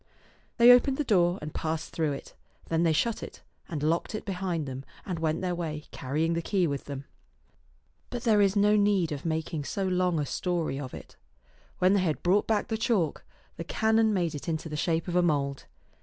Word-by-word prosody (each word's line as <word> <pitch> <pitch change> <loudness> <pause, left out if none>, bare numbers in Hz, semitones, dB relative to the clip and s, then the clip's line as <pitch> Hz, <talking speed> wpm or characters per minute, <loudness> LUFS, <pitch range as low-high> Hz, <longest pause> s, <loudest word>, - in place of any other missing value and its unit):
They 240 0 +9
opened 265 +2 +5
the 295 - 0
door 180 -7 +3
and 150 - -6
passed 160 0 -3
through 155 -3 0
it. 140 - -9 0.4
Then 165 0 +1
they 170 -1 +3
shut 225 +8 0
it, - - -9 0.3
and 150 -3 -4
locked 165 +7 0
it 215 - -5
behind 180 -5 -2
them, 130 0 -6 0.2
and 180 -4 -3
went 160 -1 0
their 180 -1 -1
way, 155 -3 -4
carrying 155 +5 -1
the 170 - -1
key 185 +1 +1
with 140 -3 -3
them. 140 -1 -6 1.0
But 245 -1 -5
there 215 -3 +4
is 200 0 +3
no 205 +1 +4
need 200 -5 +2
of 145 +1 -5
making 160 -1 -2
so 195 - -2
long 180 -2 +1
a 145 - 0
story 170 -4 -2
of 130 -3 -6
it. - - -12 0.6
When 185 +2 +4
they 200 - +3
had 160 -5 -1
brought 190 +4 +3
back 215 -2 0
the 220 - -1
chalk, 210 -9 0 0.3
the 165 - -4
canon 220 +4 +2
made 175 -5 0
it 145 +3 -5
into 160 0 -3
the 150 - -5
shape 165 +2 0
of 175 - -3
a 180 - +5
mould. 140 -5 0
170 Hz, 210 wpm, -28 LUFS, 155-200 Hz, 1.0 s, They